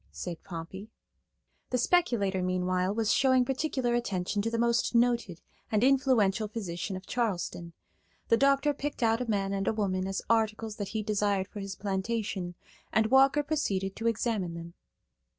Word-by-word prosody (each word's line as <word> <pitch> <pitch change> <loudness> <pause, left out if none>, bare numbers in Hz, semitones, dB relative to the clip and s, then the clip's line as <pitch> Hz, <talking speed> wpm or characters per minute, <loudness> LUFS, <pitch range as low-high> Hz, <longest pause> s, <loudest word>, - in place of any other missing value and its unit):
said 175 -2 -6
Pompey. 185 +5 -8 0.8
The 250 - +1
speculator, 235 - +2
meanwhile, 185 0 0
was 220 0 +1
showing 260 -2 +4
particular 260 -2 -1
attention 205 -4 -1
to 225 - -1
the 230 - -2
most 235 +1 +1
noted 235 -7 +2 0.3
and 215 +1 +2
influential 250 -6 +3
physician 195 -3 -4
of 185 0 -8
Charleston. 180 -7 -2 0.6
The - - +6
doctor 275 +3 +3
picked 285 -2 -4
out 225 +1 +2
a 245 - -3
man 200 -2 0
and 195 -1 -2
a - - +2
woman 190 -3 -1
as 195 0 -3
articles 220 -1 0
that 205 - -3
he 220 +1 -3
desired 205 -2 0
for 205 - -9
his 195 -1 -5
plantation, 195 -2 -3 0.4
and 220 0 +2
Walker 270 +2 +5
proceeded 195 -11 -1
to 225 - -1
examine 215 -6 -1
them. 170 0 -8
215 Hz, 160 wpm, -29 LUFS, 190-240 Hz, 0.8 s, The